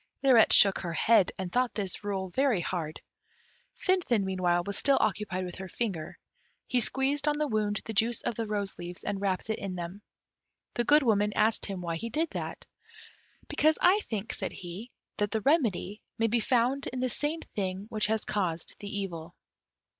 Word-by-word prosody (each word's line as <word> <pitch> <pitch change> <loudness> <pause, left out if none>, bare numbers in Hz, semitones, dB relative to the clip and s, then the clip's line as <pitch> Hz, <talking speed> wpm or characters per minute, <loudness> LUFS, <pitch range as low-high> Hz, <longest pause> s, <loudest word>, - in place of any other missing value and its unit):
Lirette 250 -5 +6
shook 195 -2 +6
her 170 -2 -4
head, 210 +2 +4
and 185 -2 -4
thought 250 0 +1
this 200 -1 -1
rule 195 -2 -2
very 260 -3 +2
hard. 165 -3 -3 0.8
Finfin 350 - +2
meanwhile 180 -2 +1
was 200 - -3
still 275 +4 +3
occupied 190 -2 -1
with 180 - -6
her 190 +1 -8
finger; 180 -10 -3 0.5
he 250 - +1
squeezed 270 +5 +1
on 295 0 +2
the 300 0 0
wound 210 -3 0
the 220 - -5
juice 225 +3 +1
of 240 - -1
the 225 0 -3
rose 205 -2 -3
leaves, 175 0 -5
and 200 -1 -3
wrapped 195 +1 -1
it 220 - -2
in 195 -2 -4
them. 175 +3 -6 0.7
The 240 - 0
Good 295 +3 +5
Woman 210 -3 +2
asked 220 +1 +2
him 195 -3 -5
why 170 -1 -3
he 230 +6 -5
did 315 +7 0
that? - - -5 0.8
"Because 310 +1 +3
I 370 +4 +5
think," 220 - -4
said 195 - -3
he, 185 +7 -8 0.3
"that 205 0 0
the 220 +2 -1
remedy 225 - +1 0.2
may 225 - +1
be 230 +2 +2
found 250 +4 +1
in 255 - -4
the 255 - +1
same 295 +7 -2
thing 190 -1 -3
which 215 -2 +2
has 220 0 -1
caused 175 -5 -2
the 205 - -6
evil." 175 -5 -5
210 Hz, 190 wpm, -29 LUFS, 190-245 Hz, 0.8 s, Lirette